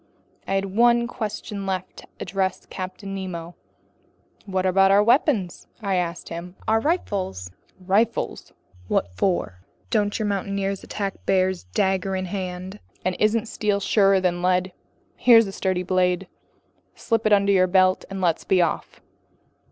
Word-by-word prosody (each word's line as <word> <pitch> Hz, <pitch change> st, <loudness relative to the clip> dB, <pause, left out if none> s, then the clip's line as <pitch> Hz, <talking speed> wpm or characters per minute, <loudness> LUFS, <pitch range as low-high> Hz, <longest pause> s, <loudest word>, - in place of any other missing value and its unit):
I 195 Hz, -, 0 dB
had 195 Hz, 0 st, +1 dB
one 235 Hz, +1 st, +4 dB
question 215 Hz, -4 st, -5 dB
left 185 Hz, -1 st, -3 dB
to -, -, -12 dB
address 190 Hz, -1 st, -1 dB
to -, -, -27 dB
Captain 185 Hz, +2 st, -6 dB
Nemo. 175 Hz, -3 st, -5 dB, 0.9 s
"What 190 Hz, -1 st, -1 dB
about 195 Hz, +1 st, +4 dB
our 200 Hz, +1 st, +5 dB
weapons?" 230 Hz, -, +1 dB
I 200 Hz, -4 st, -2 dB
asked 175 Hz, -2 st, -2 dB
him. 170 Hz, +2 st, -7 dB
"Our 220 Hz, +1 st, +3 dB
rifles?" 190 Hz, -, -2 dB, 0.3 s
"Rifles! 205 Hz, +5 st, 0 dB, 0.4 s
What 90 Hz, -, 0 dB
for? 100 Hz, -, -1 dB, 0.3 s
Don't 205 Hz, -2 st, +1 dB
your 215 Hz, -, -2 dB
mountaineers 200 Hz, -1 st, -2 dB
attack 200 Hz, -2 st, -5 dB
bears 185 Hz, -, +1 dB
dagger 190 Hz, -, 0 dB
in 185 Hz, 0 st, -2 dB
hand? 185 Hz, +1 st, -5 dB, 0.3 s
And 185 Hz, -1 st, 0 dB
isn't 215 Hz, +2 st, +2 dB
steel 210 Hz, -2 st, -1 dB
surer 195 Hz, -1 st, +3 dB
than 175 Hz, -1 st, 0 dB
lead? 185 Hz, +1 st, +1 dB, 0.5 s
Here's 230 Hz, -2 st, +6 dB
a 195 Hz, -, -5 dB
sturdy 185 Hz, -2 st, -1 dB
blade. 180 Hz, 0 st, +1 dB, 0.7 s
Slip 225 Hz, -2 st, 0 dB
it -, -, +1 dB
under 200 Hz, -1 st, +4 dB
your 185 Hz, -2 st, +4 dB
belt 185 Hz, 0 st, +3 dB
and 195 Hz, -1 st, -5 dB
let's 170 Hz, -3 st, +1 dB
be 190 Hz, -, +2 dB
off." 170 Hz, -2 st, -1 dB
190 Hz, 150 wpm, -23 LUFS, 185-205 Hz, 0.9 s, Here's